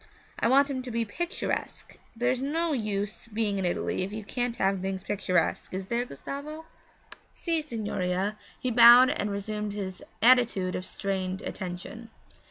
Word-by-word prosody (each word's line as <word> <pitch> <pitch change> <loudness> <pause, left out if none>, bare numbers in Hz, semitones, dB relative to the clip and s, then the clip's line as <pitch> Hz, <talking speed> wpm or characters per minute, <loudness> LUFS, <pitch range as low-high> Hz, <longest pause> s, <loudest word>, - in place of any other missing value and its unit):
I - - +2
want 275 +3 +5
him 270 -2 -3
to 255 - -7
be 230 -1 -1
picturesque 345 - -4 0.2
there's 245 +2 0
no 320 +4 0
use 210 -3 -2
being 210 -3 -1
in 190 - -1
Italy 175 - -1
if 185 +2 -2
you 215 0 -5
can't 245 +3 -2
have 195 -2 +1
things 190 -1 -3
picturesque, 185 -5 0
is 190 0 -3
there, 235 +4 -1
Gustavo?' 285 - -7 0.7
'Si, 330 -2 0
signorina,' 205 -6 -2 0.2
he 255 - -1
bowed 240 +3 +9
and 210 -9 -1
resumed 210 +1 -3
his 190 -3 -5 0.2
attitude 235 -7 +4
of 185 - -4
strained 190 -1 -3
attention. 190 +5 -6
215 Hz, 155 wpm, -28 LUFS, 195-250 Hz, 0.7 s, bowed